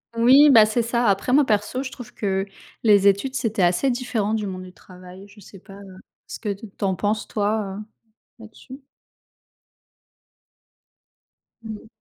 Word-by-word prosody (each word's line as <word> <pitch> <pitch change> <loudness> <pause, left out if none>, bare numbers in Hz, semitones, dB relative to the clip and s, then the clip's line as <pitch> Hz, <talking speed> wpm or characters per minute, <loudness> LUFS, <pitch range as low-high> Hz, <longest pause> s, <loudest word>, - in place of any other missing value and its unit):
Oui, 265 +6 +6
bah, 220 -4 +7
c'est 230 +2 0
ça 235 +1 -1
après 200 +6 0
moi 290 +2 +5
perso 215 +1 -1
je 265 -1 -6
trouve 245 -2 -11
que 195 -2 -2 0.4
les 205 -3 +4
études, 200 +7 +1
c'était 220 -7 -1
assez 175 +10 +2
différent 235 -4 -2
du 215 -1 -3
monde 185 -2 -6
du 185 0 -11
travail, 185 +1 -15
je 205 +1 -19
sais 195 0 -14
pas, 195 +2 -16
heu, 195 -1 -13 0.3
ce - - -8
que 220 - -5
t 200 +2 -6
tu 200 - -5
en 190 - +1
penses 205 +3 -2
toi, 205 -2 -2
heu, - - -7 0.6
là-dessus? 255 +5 -13 2.8
Mmh 220 -1 -7
mh. - - -18
210 Hz, 170 wpm, -22 LUFS, 195-235 Hz, 2.8 s, bah